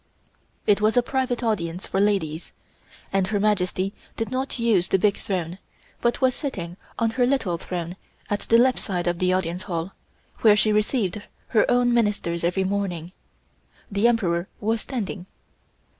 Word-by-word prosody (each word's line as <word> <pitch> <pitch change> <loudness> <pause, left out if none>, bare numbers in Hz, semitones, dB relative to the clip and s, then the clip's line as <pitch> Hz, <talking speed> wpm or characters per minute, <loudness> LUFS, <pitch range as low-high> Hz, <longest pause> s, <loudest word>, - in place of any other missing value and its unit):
It 205 0 +4
was 215 +3 +3
a 245 - +5
private 255 -1 -1
audience 180 -6 -1
for 190 - -1
ladies, 185 -6 0 0.6
and 195 -1 +2
Her 205 0 0
Majesty 195 -2 +1 0.2
did 225 +1 -2
not 260 +1 -2
use 225 -7 +3
the - - +3
big 200 +1 +3
throne, 180 -2 -3 0.4
but 240 +2 +1
was 260 -1 +4
sitting 180 - -5 0.2
on 230 -1 +1
her 245 +1 +2
little 220 -11 0
throne 175 -1 -4 0.3
at 205 - -1
the 230 - +3
left 255 +1 +4
side 180 -4 -2
of 175 -1 0
the 185 0 +2
Audience 180 -1 0
Hall, 170 +1 -2 0.5
where 215 -2 +6
she 215 +1 +3
received 210 -2 0 0.3
her 220 -3 +3
own 245 0 +3
Ministers 205 -7 0
every 180 +3 +1
morning; 185 -4 -2 0.8
the 200 +3 +3
Emperor 185 -7 +1
was 220 +1 0
standing. 200 -7 -4
200 Hz, 160 wpm, -24 LUFS, 180-230 Hz, 0.8 s, where